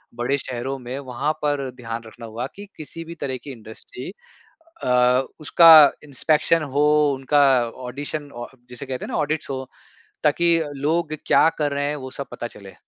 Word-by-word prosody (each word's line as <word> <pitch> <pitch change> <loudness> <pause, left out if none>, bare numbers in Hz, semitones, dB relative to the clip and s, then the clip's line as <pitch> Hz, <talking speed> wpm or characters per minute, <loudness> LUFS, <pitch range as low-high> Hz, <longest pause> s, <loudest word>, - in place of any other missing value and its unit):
बड़े 125 +4 0
शहरों 130 0 -4
में 125 +1 -6
वहाँ 135 +2 -2
पर 145 -3 -1
ध्यान 115 -2 -6
रखना 115 +1 -11
होगा 115 +2 -5
कि 205 - -9
किसी 160 +2 -8
भी 170 +1 -9
तरह 135 -5 -4
की 140 - -8
इंडस्ट्री 110 -3 -9 0.7
अ, 125 +1 +3 0.2
उसका 165 +2 +7 0.3
इंस्पेक्शन 155 +3 +2
हो 145 - +4 0.3
उनका 135 +2 +2 0.5
ऑडिशन 145 +3 -4
औ - - -7 0.2
जिसे 125 +3 -7
कहते 130 -1 -5
हैं - - -8
ना - - -1
ऑडिट्स 150 0 -2
हो 130 -1 -4 0.6
ताकि 170 +3 +3 0.2
लोग 155 +3 -1
क्या - - +5
कर 145 -1 0
रहे 145 0 -1
हैं 150 - -2
वह 130 -2 -8
सब 140 - -4
पता 120 - -5
चले। 100 -4 -13
140 Hz, 170 wpm, -22 LUFS, 125-150 Hz, 0.7 s, उसका